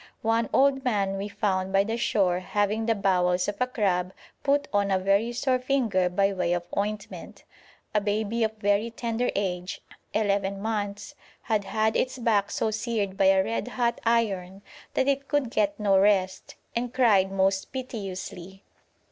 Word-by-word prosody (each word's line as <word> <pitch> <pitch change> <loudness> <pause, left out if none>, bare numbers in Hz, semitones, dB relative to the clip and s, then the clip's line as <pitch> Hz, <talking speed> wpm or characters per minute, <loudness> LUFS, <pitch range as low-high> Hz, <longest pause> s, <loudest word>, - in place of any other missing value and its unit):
One 225 0 +1
old 270 -1 +3
man 200 -6 0
we 195 +1 -3
found 190 -2 -1
by 195 0 +4
the 225 +2 -2
shore 190 -6 +1
having 205 +4 -1
the 225 - +3
bowels 180 -2 +1
of 205 -1 -3
a 250 - +3
crab 190 -6 -1 0.3
put 285 +1 +1
on 200 -1 +2
a 190 - +3
very 200 +5 +1
sore 255 +1 0
finger 235 -9 +1
by 195 +2 +1
way 180 -2 0
of 175 0 -3
ointment. 210 +1 -4 0.5
A 210 - +2
baby 215 +2 -1
of 220 0 0
very 205 +1 +1
tender 235 +1 -2
age 180 -2 -2 0.3
(eleven 200 -2 0
months) 205 -1 -3 0.3
had 215 -3 0
had 220 +2 0
its 260 0 0
back 220 -5 +1
so 220 - -1
seared 215 -3 -2
by 195 - +2
a 190 0 +5
red 230 +4 -3
hot 240 -1 -1
iron 200 -5 0 0.3
that 265 - +2
it 275 0 0
could 290 -5 0
get 205 -2 0
no 200 -2 +3
rest, 190 -2 +1 0.2
and 240 +1 -2
cried 205 -7 +4
most 195 0 0
piteously. 195 -6 -6
205 Hz, 165 wpm, -26 LUFS, 195-230 Hz, 0.5 s, a